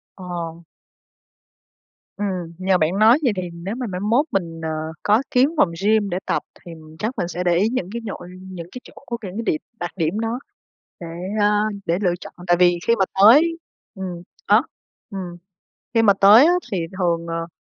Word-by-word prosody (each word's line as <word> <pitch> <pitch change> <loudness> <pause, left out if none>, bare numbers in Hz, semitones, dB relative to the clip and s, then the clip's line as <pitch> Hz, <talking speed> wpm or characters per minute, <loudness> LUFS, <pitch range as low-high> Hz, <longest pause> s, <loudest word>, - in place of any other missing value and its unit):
Ờ. 170 -2 -6 1.5
Ừm, 185 -5 -3
nhờ 185 0 +2
bạn 170 +5 +1
nói 225 +5 +6
vậy 250 -6 +2
thì 185 - -2
nếu 170 +5 -5
mà 250 -1 -4
mai 180 -2 -4
mốt 230 +8 +2
mình, 165 -4 -2
ờ, 160 - -3 0.3
có 215 +4 +3
kiếm 255 +3 +4
phòng 300 - +4 0.2
gym 210 -2 +3
để 175 - -1
tập, - - 0 0.2
thì, 170 - -9 0.3
chắc 225 +5 -3
mình 170 - -1
sẽ 180 0 -4
để 175 -1 +3
ý 200 +5 +3
những 230 -7 -2
cái 235 0 -4
nhội 185 -4 -7
những 185 -3 -8
cái 250 - -8
chỗ - - -15
của 235 - -3
cái 205 -6 -8
điểm 155 - +1 0.2
đặc 175 0 -3
điểm 170 +4 -1
đó 225 +2 -2 0.6
để, 170 - -7 0.3
a, 210 0 +3 0.2
để 170 +2 +1
lựa 180 -3 +2
chọn - - -10
tại 175 -1 +4
vì 175 0 +4
khi 230 - +5
mà 190 - +4 0.2
tới 300 +11 +6 0.4
ừm, 185 -3 -6 0.2
á, 210 +3 +6 0.5
ừm, 180 -3 -6 0.6
khi 230 - +4
mà 205 -3 +6
tới, 215 +8 +8
á, 345 - +5 0.2
thì 195 - 0 0.2
thường, 170 -2 0
ờ, 165 0 -3
190 Hz, 195 wpm, -21 LUFS, 175-220 Hz, 1.5 s, tới